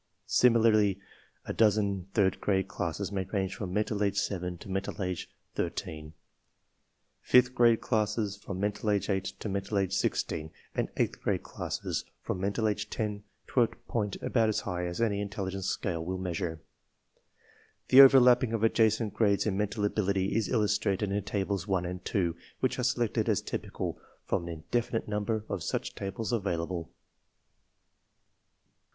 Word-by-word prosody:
Similarly, 110 -5 +4 0.5
a - - -3
dozen 100 -4 +2
third 95 -4 +2
grade 95 -1 +1
classes 95 +1 -3
may 95 -1 -1
range 95 0 -2
from 100 -6 -5
mental 105 +1 -1
age 100 -1 +1
7 90 -3 -2
to - - -12
mental 95 +2 -3
age 90 -2 -3 0.2
13, 75 0 -4 1.1
fifth 125 0 +5
grade 120 -2 +4
classes 105 -2 0
from 100 -2 -7
mental 105 +2 -1
age 100 0 +1
8 95 -1 0
to - - -6
mental 100 +1 -2
age 95 -1 +1
16, 80 -5 -1 0.2
and - - -1
eighth - - 0
grade - - 0
classes - - -3 0.2
from - - -3
mental 100 +3 0
age 105 - -2
10 105 -2 -3 0.3
to 125 - +3
a 115 - +5
point 110 -4 -3
about 115 -3 +2
as 110 - 0
high 90 -2 -3
as 85 +3 -5
any 105 -3 +1
intelligence 100 -2 -3
scale 85 -4 -2
will 95 +2 -3
measure. 85 -3 -3 1.3
/~The 130 - +8
overlapping 125 -3 +7
of 115 -1 -1
adjacent 110 -1 +3
grades 100 -3 +2
in 105 -3 0
mental 105 +1 -1
ability 100 -2 0
is 110 -3 +1
illustrated 105 -3 +1
in 100 0 0
Tables 100 0 -2
1 95 -3 +1
and 90 +1 -5
2, 85 -5 0 0.2
which 130 0 0
are - - 0
selected 120 -2 +1
as - - +1
typical - - -4 0.3
from 85 - -1
an - - -5
indefinite 115 +8 -2
number 105 +1 -1
of 100 -3 -3
such - - -2
tables 100 +4 -4
avail 95 -7 0
able. 85 -1 -5
100 Hz, 160 wpm, -30 LUFS, 95-110 Hz, 1.3 s, ~The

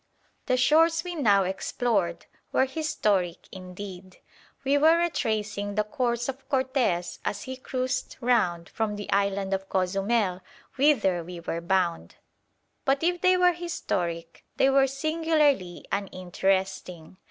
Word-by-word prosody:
The 255 - +2
shores 325 +5 +4
we 360 -1 -5
now 210 - +3
explored 190 -1 -1 0.3
were 260 - +3
historic 210 - -1
indeed. 185 0 -9 0.5
We 275 +1 +2
were 320 +3 +6
retracing 215 -11 -1
the 210 - +2
course 240 0 -1
of 270 0 -6
Cortes 260 -10 0
as 205 - -3
he 260 0 -6
cruised 255 0 -3
round 210 -10 +1
from 220 -2 -2
the 205 0 -6
island 200 -1 +1
of 195 0 -3
Cozumel, 195 +1 0 0.3
whither 220 - +3
we 175 +1 -8
were 170 0 -4
bound. 175 -1 0 0.7
But 275 +2 +1
if 350 +1 +1
they 370 0 +4
were 360 -1 +4
historic, 170 - -4
they 270 - +4
were 270 0 +4
singularly 300 - 0
uninteresting. 190 -2 -2
210 Hz, 130 wpm, -26 LUFS, 185-270 Hz, 0.7 s, were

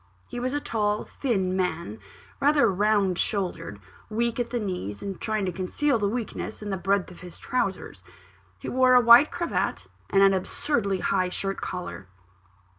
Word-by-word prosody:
He 245 - -6
was 255 +3 -2
a - - +1
tall, 210 -5 -1
thin 190 -9 -1
man: 170 - -2 0.4
rather 290 -4 +4
round 200 -2 +2
shouldered; 180 - -2 0.3
weak 235 +2 -1
at 240 - -1
the 240 - -2
knees, 180 - -4
and 195 -2 -6
trying 215 -2 -1
to 185 - -1
conceal 225 - 0
the 200 -1 +1
weakness 220 -1 -5
in 205 - -4
the - - 0
breadth 190 +1 0
of 180 - -13
his 180 -2 -11
trowsers. 200 -7 -3 0.6
He - - -9
wore 255 0 +4
a - - +9
white 240 +4 +8
cravat, 345 -1 -2 0.2
and 195 0 +4
an 195 0 +6
absurdly 200 0 -1
high 185 -2 +1
shirt 195 +1 -3
collar. 180 - -6
200 Hz, 170 wpm, -26 LUFS, 185-235 Hz, 0.6 s, a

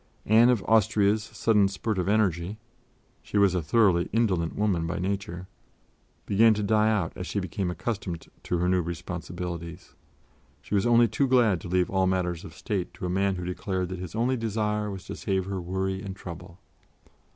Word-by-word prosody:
Anne 115 +3 +6
of 120 -6 +2
Austria's 110 -1 +3
sudden 105 -1 +2
spurt 100 +1 -2
of 90 - -1
energy 100 -2 +1 0.6
she - - -3
was 100 -2 +4
a 90 - 0
thoroughly 90 0 +3
indolent 95 -7 +1
woman 95 -6 0
by 80 - -3
nature 95 -1 -3 0.8
began 110 +2 +5
to 105 - -2
die 110 +1 +3
out 100 -7 0
as 90 - -6
she 100 - -2
became 95 0 -3
accustomed 90 -1 -4 0.2
to 90 - -1
her 90 +1 0
new 90 0 +2
responsibilities; 85 +1 -6 0.7
she - - -9
was 100 +3 +2
only 120 0 +5
too 135 +6 0
glad 120 -8 +3
to - - -7
leave 90 0 +1
all 95 -1 +2
matters 90 -2 -1
of 85 -5 -10
State 95 -6 -3
to 90 - -6
a - - -2
man 95 +1 +1
who 90 -1 -5
declared 90 0 -3
that 95 -1 -5
his 90 -3 -7
only 120 +3 +1
desire 105 -2 -1
was 95 -2 -7
to - - -6
save 95 -2 -1
her 95 -1 -4
worry 95 +2 -2
and 100 -2 -6
trouble. 85 -2 -9
95 Hz, 185 wpm, -27 LUFS, 90-105 Hz, 0.8 s, Anne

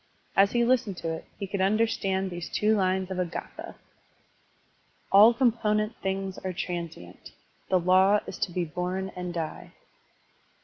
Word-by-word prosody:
As 200 +1 +4
he 235 -1 +3
listened 235 -6 +1
to 165 -1 -3
it 160 - -7
he 200 - -4
could 195 0 -3
understand 195 -2 +1
these 175 -1 -6
two 215 +1 +2
lines 190 -1 0
of 185 - -3
a - - +3
gSthS: 170 - -8 1.4
"All 205 +4 +8
component 220 -3 +1
things 190 0 -3
are 185 -1 -4
transient; 170 - -6 0.4
The 185 - +4
law 190 +3 +4
is - - -8
to 180 - -1
be 175 0 -1
bom 180 +3 -3
and 180 -1 -4
die." 165 -2 -5
190 Hz, 150 wpm, -27 LUFS, 180-210 Hz, 1.4 s, All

